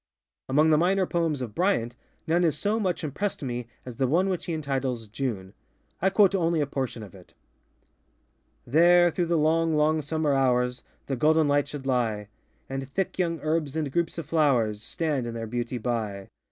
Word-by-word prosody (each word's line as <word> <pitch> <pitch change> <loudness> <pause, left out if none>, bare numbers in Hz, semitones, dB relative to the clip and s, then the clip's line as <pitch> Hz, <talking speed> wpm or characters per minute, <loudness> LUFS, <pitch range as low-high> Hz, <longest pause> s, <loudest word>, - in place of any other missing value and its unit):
Among 150 +4 +4
the 155 - +5
minor 190 +2 +2
poems 165 -6 -1
of 115 -4 -7
Bryant, 150 - +1 0.3
none 170 +2 +2
has 160 -4 +2
so 210 +6 0
much 185 -6 -1
impressed 155 +5 -3
me 120 -2 -4 0.2
as 125 -2 -8
the 135 -1 +1
one 180 +8 +2
which 185 -2 -2
he 170 - -3
entitles 135 -6 -2
ŌĆ£June.ŌĆØ 105 -5 -4 0.5
I 190 - +4
quote 195 0 +4
only 170 -3 +1
a 145 - +2
portion 130 -5 -4
of 100 - -12
it:ŌĆö 95 -2 -17 1.4
There, 175 +3 +6
through 175 +1 -1
the 170 0 +1
long, 160 +1 +2
long 155 +1 +2
summer 150 0 0
hours, 125 -2 +1 0.2
The 135 - -2
golden 155 +4 +3
light 145 0 +2
should 145 -2 -7
lie, 115 -6 -1 0.4
And 135 0 -5
thick 190 +6 -3
young 170 -2 0
herbs 155 -2 -1
and 155 -4 -2
groups 170 +2 -1
of 165 - -4
flowers 125 -10 +1
Stand 145 0 -2
in 115 - -5
their 115 -1 -4
beauty 120 +2 -3
by. 110 -5 -3
145 Hz, 185 wpm, -26 LUFS, 125-165 Hz, 1.4 s, There